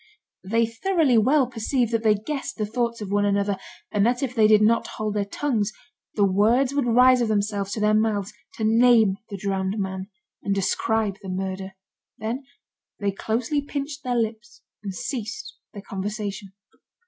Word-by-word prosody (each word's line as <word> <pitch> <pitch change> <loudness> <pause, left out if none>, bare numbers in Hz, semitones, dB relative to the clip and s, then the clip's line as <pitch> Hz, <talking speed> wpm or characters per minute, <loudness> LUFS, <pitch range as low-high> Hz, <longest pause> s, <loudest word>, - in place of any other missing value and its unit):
They 230 +4 +2
thoroughly 270 +1 +2
well 270 +5 +4
perceived 240 0 -1
that 230 - +2
they 215 -2 +4
guessed 270 +7 -5
the 215 - -1
thoughts 235 +1 -2
of 200 -2 -5
one 205 0 +2
another, 200 0 +1 0.4
and 205 -2 +2
that 245 +4 +1
if 255 -2 -2
they 220 -3 +5
did 215 0 +5
not 230 +2 +3
hold 215 -1 -2
their 205 -1 0
tongues, 215 -1 -1 0.4
the 205 - +4
words 225 +8 +3
would 280 -3 0
rise 250 +2 +5
of 235 - +1
themselves 205 -2 -1
to - - -3
their 210 0 +3
mouths, 210 -2 +1 0.2
to 220 - -4
name 225 -3 +5
the 200 - -5
drowned 195 +1 -2
man, 190 -1 -3 0.3
and 200 - -1
describe 205 +1 0
the 195 - -8
murder. 190 +1 -4 0.4
Then 240 +5 -4 0.5
they 200 -1 0
closely 230 +8 -1
pinched 285 0 -5
their 250 -2 -1
lips 220 -2 -3 0.2
and 200 -2 -4
ceased 235 - -5 0.2
their 200 -2 -9
conversation. 200 0 -5
215 Hz, 170 wpm, -24 LUFS, 200-240 Hz, 0.5 s, they